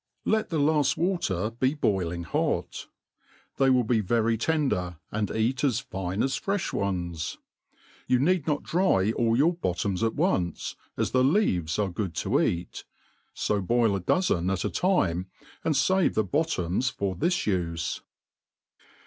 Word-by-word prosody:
Let^the 215 -7 +1
laft 150 -1 +2
water 115 - 0
be 130 +5 0
boiling 90 - -1
hot. - - -2 0.7
They 135 -1 +4
will 125 -1 +4
be 115 0 +1
very 115 +2 +1
tender, 115 - 0
and 105 -2 -1
eat 115 +4 0
^s 130 -4 +1
fine 95 -6 -3
as 135 -1 0
freih 200 -1 -2
ones. 85 -4 -2 0.7
You 125 - +4
peed 165 +3 +1
not 150 -2 0
dry 135 - +2
all 115 0 +1
your 160 +6 +4
bottoms 95 - -2
at 115 -1 0
once, 140 - -1 0.2
as - - 0
the 130 0 +3
leaves 95 - +2
are 100 -3 0
gck>d 90 -1 -3
to - - +1
eat: 85 0 -2 0.5
fo 105 -1 0
boil 115 +1 +2
a - - -1
dozen 90 - +1
at 95 -2 -1
a - - -1
time, 95 - +1 0.4
and 160 - +1
fave 185 +7 +2
the 110 - +3
bottoms 125 - 0
for 100 -7 -2
this 175 - +1
ufe. 85 -4 -2
115 Hz, 150 wpm, -27 LUFS, 95-145 Hz, 0.7 s, They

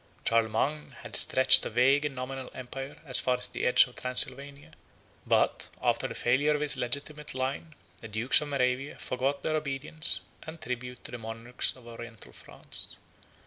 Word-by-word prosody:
Charlemagne 115 +6 0
had - - -7
stretched 130 0 +7
a - - -4
vague 135 +5 +3
and 145 -2 -4
nominal 130 0 -6
empire 135 +2 -8
as 130 -4 +4
far 125 -1 0
as 125 - -1
the - - -5
edge 125 - +6
of 125 - -15
Transylvania; 140 +2 -2 0.6
but, - - +1
after - - 0
the - - -8
failure 145 +5 +1
of 150 - -3
his 150 -1 0
legitimate 140 +4 -4
line, 135 +4 -4 0.2
the 115 - -10
dukes 115 +7 +5
of 150 - -4
Moravia 135 0 -1
forgot 135 +3 -3
their 155 - -1
obedience 155 +2 +1 0.2
and 160 +1 -10
tribute 125 -4 -6
to - - -8
the 120 - -7
monarchs 115 +2 -4
of 130 -2 -17
Oriental 120 -2 -11
France. - - -8
130 Hz, 170 wpm, -28 LUFS, 125-145 Hz, 0.6 s, stretched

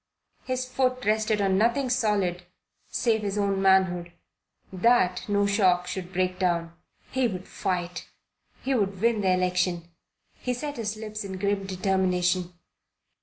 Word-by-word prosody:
His 255 0 -2
foot 255 0 0
rested 215 0 +2
on 190 -1 +2
nothing 240 +5 +2
solid 200 -7 0 0.4
save 225 -3 +1
his 205 -1 -2
own 200 -1 +1
manhood. 185 -3 +3 0.6
That 185 -2 +3
no 205 0 +2
shock 190 -3 +3
should 180 0 -5
break 185 0 -1
down. 170 -2 0 0.4
He 260 -1 +2
would 185 -4 -6
fight. 180 -1 -3 0.5
He 270 - 0
would 200 -6 0
win 230 0 +2
the 190 - +2
election. 180 -2 0 0.4
He 250 -1 -3
set 290 +3 -5
his 215 -2 -3
lips 215 -1 -5
in 190 -1 -6
grim 200 0 -1
determination. 185 -1 +1
195 Hz, 140 wpm, -26 LUFS, 180-220 Hz, 0.6 s, manhood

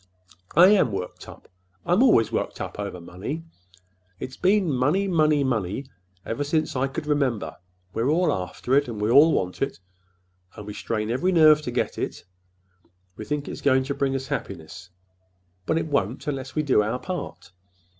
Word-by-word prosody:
"I 175 +4 +8
am 200 - +4
worked 90 -2 -6
up. - - -13 0.4
I'm 180 +6 +3
always 220 - +4
worked - - -2
up—over 100 -3 -5
money. 95 - -6 0.8
It's 130 - -6
been 185 -4 +2
money, 145 +11 +1
money, 155 -5 +3
money, 115 -1 -1 0.4
ever 125 +6 -2
since 155 +1 -1
I 130 +1 +1
could 140 +3 -5
remember! 130 - -1 0.4
We're 115 +4 0
all 160 0 +2
after 95 +7 -4
it, 140 0 +4
and 115 -3 -6
we 105 +2 +1
all 145 +6 +7
want 90 -10 -1
it, 135 -9 -2 0.8
and 105 - -9
we 105 - -6
strain 110 +1 -3
every 175 +10 +1
nerve 155 -3 +6
to 145 - -5
get 120 - -2
it. - - -4 0.9
We - - -8
think 150 -1 -3
it's - - -6
going 130 -2 +3
to 140 +2 -3
bring 140 -1 -1
us 135 0 -3
happiness. 90 0 -6 0.8
But 160 - +2
it - - 0
won't—unless 135 - -2
we 155 - +1
do 130 -7 +3
our 110 +4 -1
part. 180 - -6
135 Hz, 170 wpm, -24 LUFS, 110-155 Hz, 0.9 s, I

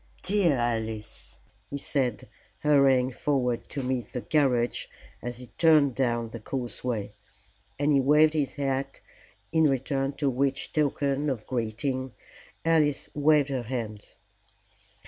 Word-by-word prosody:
"Dear 185 -5 +3
Alice," 110 -2 -3 0.3
he 140 - -4
said, 130 -5 -2 0.3
hurrying 135 -3 +4
forward 125 -2 -1
to 140 - -4
meet 125 -1 -3
the 125 - -4
carriage 125 -6 +1 0.3
as 120 0 -5
it 125 - -13
turned 155 -5 +5
down 120 -3 0
the 115 - -7
causeway. 120 -3 -4 0.6
And 145 +1 +2
he 140 - +5
waved 150 +3 +5
his 150 -4 -1
hat, 135 -1 -2 0.5
in 160 -1 +4
return 135 0 0
for 140 0 0
which 135 +2 -1
token 145 -1 +1
of 120 -6 -3
greeting 130 +2 -2 0.5
Alice 155 -3 +2
waved 150 -1 +3
her 130 -2 -1
hand. 115 -3 -6
135 Hz, 125 wpm, -27 LUFS, 120-145 Hz, 0.6 s, turned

